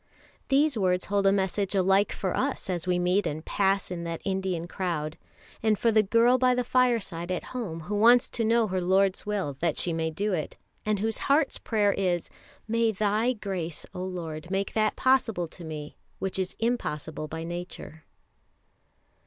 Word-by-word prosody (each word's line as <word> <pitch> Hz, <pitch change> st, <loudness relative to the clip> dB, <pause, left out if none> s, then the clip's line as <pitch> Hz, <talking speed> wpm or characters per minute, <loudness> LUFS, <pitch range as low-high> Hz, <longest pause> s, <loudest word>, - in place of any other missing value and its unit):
These 280 Hz, -2 st, +3 dB
words 180 Hz, -1 st, +1 dB
hold 200 Hz, -1 st, +1 dB
a -, -, +6 dB
message 195 Hz, 0 st, 0 dB
alike 195 Hz, +2 st, +3 dB
for 190 Hz, -3 st, -2 dB
us 265 Hz, -7 st, -1 dB
as 175 Hz, 0 st, -3 dB
we 180 Hz, -1 st, +2 dB
meet 180 Hz, +3 st, +2 dB
and 155 Hz, +2 st, -4 dB
pass 195 Hz, -1 st, +1 dB
in 170 Hz, -1 st, -4 dB
that 165 Hz, -1 st, -4 dB
Indian 190 Hz, -3 st, -1 dB
crowd, 165 Hz, -5 st, -3 dB, 0.5 s
and 215 Hz, -1 st, +2 dB
for 230 Hz, -, +2 dB
the 215 Hz, 0 st, +5 dB
girl 230 Hz, +5 st, +4 dB
by 250 Hz, 0 st, +4 dB
the 250 Hz, -, +1 dB
fireside 230 Hz, -9 st, +1 dB
at 180 Hz, -2 st, -2 dB
home 195 Hz, -10 st, -4 dB
who 180 Hz, +6 st, -5 dB
wants 235 Hz, +4 st, +6 dB
to 230 Hz, -, -2 dB
know 230 Hz, +1 st, +3 dB
her 185 Hz, -2 st, -1 dB
Lord's 190 Hz, +2 st, +2 dB
will 190 Hz, -10 st, -2 dB
that 165 Hz, -2 st, 0 dB
she 175 Hz, -, 0 dB
may 160 Hz, 0 st, -1 dB
do 200 Hz, +6 st, -2 dB
it, 155 Hz, -5 st, -3 dB, 0.3 s
and 215 Hz, -1 st, +2 dB
whose 220 Hz, +2 st, -2 dB
heart's 280 Hz, 0 st, +3 dB
prayer 205 Hz, -3 st, +1 dB
is: 180 Hz, -3 st, -1 dB, 0.4 s
"May 230 Hz, 0 st, +2 dB
Thy 215 Hz, +4 st, +1 dB
grace, 185 Hz, -7 st, -4 dB
O 180 Hz, -, -5 dB
Lord, 170 Hz, -3 st, -5 dB
make 195 Hz, +1 st, -1 dB
that 215 Hz, -1 st, +1 dB
possible 230 Hz, -9 st, +2 dB
to 175 Hz, -, -10 dB
me 155 Hz, -2 st, -7 dB, 0.2 s
which 190 Hz, 0 st, -3 dB
is 185 Hz, -1 st, -2 dB
impossible 160 Hz, -10 st, -2 dB
by 160 Hz, +2 st, -5 dB
nature." 170 Hz, -2 st, -7 dB
195 Hz, 180 wpm, -27 LUFS, 175-220 Hz, 0.5 s, a